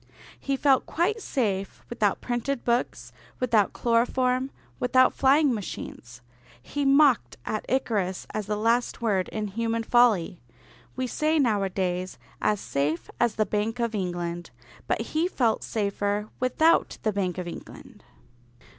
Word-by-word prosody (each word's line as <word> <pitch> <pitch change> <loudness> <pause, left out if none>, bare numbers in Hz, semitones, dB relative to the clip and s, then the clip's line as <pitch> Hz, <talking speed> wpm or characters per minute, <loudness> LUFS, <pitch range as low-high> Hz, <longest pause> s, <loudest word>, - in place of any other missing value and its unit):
He 275 -1 -1
felt 270 -2 +3
quite 415 +7 0
safe 200 - -2
without 210 -4 0
printed 245 +2 -2
books, 240 +1 -1 0.3
without 225 -5 +2
chloroform, 250 +2 +1 0.3
without 255 +1 +4
flying 275 +1 +4
machines. 120 - -7 0.4
He 285 - -3
mocked 275 - +4
at 215 - -3
Icarus 210 -8 -1
as 215 -2 -3
the 210 0 -1
last 235 +2 0
word 195 -5 +1
in 210 -1 -3
human 230 +2 -1
folly. 220 -8 +3 0.5
We 255 - -1
say 305 +5 0
nowadays 190 -7 0 0.2
"as 210 -1 +1
safe 150 +2 -2
as 240 -2 +2
the 215 - +1
Bank 215 +4 -2
of 235 -1 -1
England," 175 -3 -3 0.4
but - - 0
he 320 +3 +2
felt 240 -10 0
safer 205 0 -1
without 315 +6 +2
the 215 - +1
Bank 185 -3 -1
of 180 -1 -4
England. 170 - -10
225 Hz, 135 wpm, -26 LUFS, 195-255 Hz, 0.5 s, without